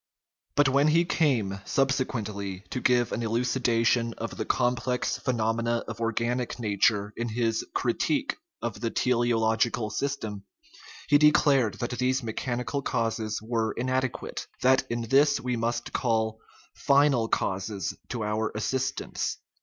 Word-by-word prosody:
But 145 -1 +5
when 140 +3 +3
he 165 +3 +4
came 120 - +1
subsequently 110 -8 -1
to 125 - -3
give 120 -1 +3
an - - -2
elucidation 115 0 +1
of 115 - -5
the 110 - -3
complex 125 +1 0
phenomena 115 -1 0
of 115 0 -6
or 115 0 +1
ganic 120 +2 -1
nature 105 -1 +1
in 120 0 -3
his 115 0 0
critique 275 - 0 0.3
of - - -4
the 115 - 0
teleological 115 -2 +1
system, 110 -5 -3 0.6
he 145 0 +5
declared 140 -7 +4
that 120 - -4
these 130 +1 +1
mechanical 125 +4 -3
causes 115 -4 -2
were 115 -1 -1
inade 130 +1 0
quate; - - -7 0.2
that 130 +1 +4
in 120 0 -2
this 140 +5 +4
we 125 0 -2
must 115 +1 -2
call 110 -2 0 0.3
final 140 -4 +3
causes 95 -2 -2 0.2
to 120 -3 -3
our 105 +1 -1
as 110 - -2
sistance. 130 0 -2
120 Hz, 140 wpm, -27 LUFS, 110-130 Hz, 0.6 s, But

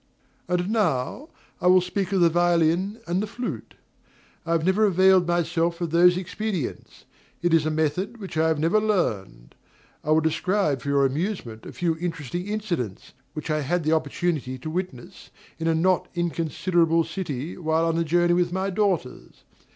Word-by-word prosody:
And 180 +2 0
now 205 - -1 0.3
I 180 - +2
will 185 +1 +7
speak 185 +1 -3
of 190 -2 +2
the 170 - +6
violin 175 +4 +2
and 175 +3 0
the 215 - -3
flute. 205 - -6 0.7
I 165 - +1
have 165 -1 +1
never 195 +4 +3
availed 190 -2 +4
myself 170 0 0
of 170 -3 -3
those 175 +1 +5
expedients; 185 - -5 0.4
it 175 -1 +2
is 160 -1 +4
a - - +1
method 160 +9 -1
which 195 -6 -8
I 160 +1 +2
have 160 -1 +1
never 165 +8 +2
learned. 105 - -2 0.5
I - - -6
will 155 +1 +5
describe 160 -2 0
for 140 - -5
your 140 -1 +3
amusement 135 - -3
a - - -7
few 170 -2 -1
interesting 170 +1 -4
incidents, 175 - -4 0.2
which 155 +1 -5
I 155 0 0
had 165 +3 -1
an 155 - +2
opportunity 155 -3 -1
to 155 +5 -6
witness 175 -8 -6 0.3
in 165 - -2
a 165 - +2
not 180 +3 +2
inconsiderable 170 0 +1
city, 160 -3 -5
while 160 -1 0
on 165 0 0
a - - +2
journey 175 +2 +2
with 175 0 +1
my 190 +2 -1
daughters. 190 -10 -2
170 Hz, 175 wpm, -24 LUFS, 155-185 Hz, 0.7 s, will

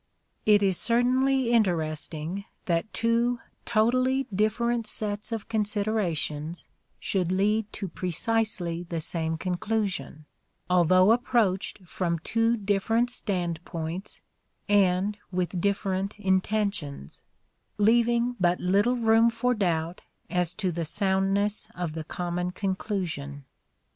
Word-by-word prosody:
It 205 -1 +6
is 190 -3 +2
certainly 255 +1 +2
interest 170 -9 +1
ing 170 +6 -5 0.2
that 170 +4 0
two 235 +1 +1 0.3
totally 255 +4 +2
different 225 +3 +1
sets 210 +1 -3
of 225 -2 -4
considerations 200 -8 -1 0.3
should 185 -3 -1
lead 210 +3 +1
to 200 - -4
precisely 185 0 -1
the 170 -1 -4
same 160 0 -1
conclusion, 185 -3 -2 0.4
although 185 +2 +5
approached 225 -6 +1
from 170 -1 -1
two 230 +7 +1
different 215 +4 +1
standpoints 175 -2 -3 0.5
and 200 0 +2
with 180 -1 -1
different 195 0 -1
intentions; 190 - -1 0.6
leaving 235 +3 +3
but 175 -1 +2
little 200 +7 +2
room 225 -1 +4
for 235 +2 0
doubt 175 -5 -1 0.3
as 180 -1 0
to 190 -4 -1
the 170 0 -3
soundness 195 +3 0
of 175 -3 -3
the 160 0 -4
common 175 +2 -3
conclusion. 180 -7 -3
195 Hz, 110 wpm, -27 LUFS, 175-225 Hz, 0.6 s, It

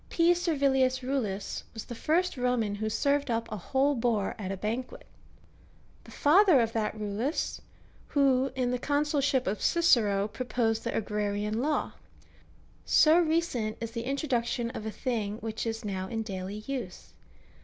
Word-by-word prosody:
P. 340 +1 +4
Servilius 270 -6 +1
Eullus 225 -7 -2
was 220 - -6
the - - -7
first 335 +9 0
Roman 245 -5 0
who 215 +1 -2
served 280 +5 +1
up 230 -1 -1
a - - -2
whole 270 +9 +1
boar 230 -5 0
at 190 -2 -4
a 195 - -3
banquet; 230 +6 -4 1.0
the - - -14
father 350 0 +5
of 230 -1 0
that 220 -1 -1
Eullus, 215 +7 -2 0.5
who, 270 -2 +3
in 250 -1 0
the 250 - -1
consulship 285 -2 +1
of 205 - -2
Cicero, 215 - +3
proposed 225 -1 -1
tlie - - -2
Agrarian 210 +1 -1
law. 300 +2 0 0.9
So 315 +2 +5
recent 315 -10 0
is 230 0 -5
the 230 0 -4
introduction 245 -4 -1
of 220 - -6
a - - -3
thing 215 -4 -2
which 225 +1 -4
is 225 0 -4
now 190 -2 -3
in 225 +2 -3
daily 195 0 -6
use. 255 -9 -6
240 Hz, 155 wpm, -29 LUFS, 215-280 Hz, 1.0 s, father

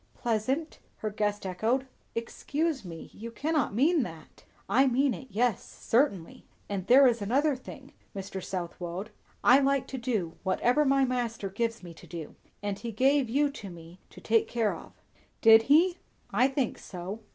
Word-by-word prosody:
"Pleasant!" 255 +8 -1 0.2
her 215 - -4
guest 205 -1 -1
echoed. 225 +8 0 0.3
"Excuse 285 +5 -2
me; 165 -3 -9
you 230 +2 -8
cannot 290 -1 -1
mean 305 +7 +3
that?" 165 -9 -9 0.2
"I 265 +2 +4
mean 265 +1 +2
it, 260 - -9
yes, 230 +1 0
certainly. 225 - -1 0.2
And 195 -2 -4
there 270 +4 +8
is 235 -3 +3
another 275 +8 +2
thing, 255 - -11 0.2
Mr. 195 -1 -6
Southwode; 180 +1 -5 0.3
I 255 +3 +7
like 275 -1 +2
to 265 - -5
do 215 -9 -2
whatever 245 +9 +2
my 275 0 +4
Master 235 -5 -2
gives 230 +1 -2
me 170 -1 -9
to 160 - -15
do; 165 -3 -7 0.3
and 200 -1 -3
he 235 - -5
gave 265 +3 +2
you 285 +4 +2
to 210 -8 -9
me 170 +1 -12
to - - -13
take 225 0 +2
care 230 -3 0
of." - - -12 0.5
"Did 225 -1 +8
he?" 345 +5 +5 0.3
"I 240 +6 +4
think 270 -3 -2
so." 185 +4 -7
230 Hz, 165 wpm, -29 LUFS, 195-270 Hz, 0.5 s, there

